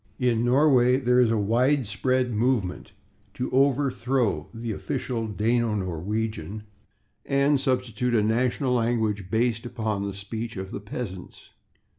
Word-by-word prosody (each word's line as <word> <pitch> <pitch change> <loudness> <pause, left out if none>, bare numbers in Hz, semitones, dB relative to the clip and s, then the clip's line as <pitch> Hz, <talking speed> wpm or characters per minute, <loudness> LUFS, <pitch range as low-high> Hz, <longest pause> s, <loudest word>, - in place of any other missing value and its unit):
In 120 -3 +1
Norway 125 -1 +4
there 125 -1 +2
is 125 -2 +5
a 115 - +1
widespread 125 +2 +1
movement 105 -4 -1 0.4
to 125 - -3
overthrow 135 -2 +1
the 115 0 -5
official 120 0 -3
Dano 110 +1 0
Norwegian, 100 +2 -3 0.6
and 140 +1 +2
substitute 125 -2 0
a 105 - +3
national 125 +4 +1
language 110 -5 0
based 115 +1 +1
upon 110 -4 -3
the 100 -1 -4
speech 110 +3 -6
of 95 0 -6
the - - -4
peasants. 100 -3 -7
115 Hz, 125 wpm, -25 LUFS, 105-125 Hz, 0.6 s, is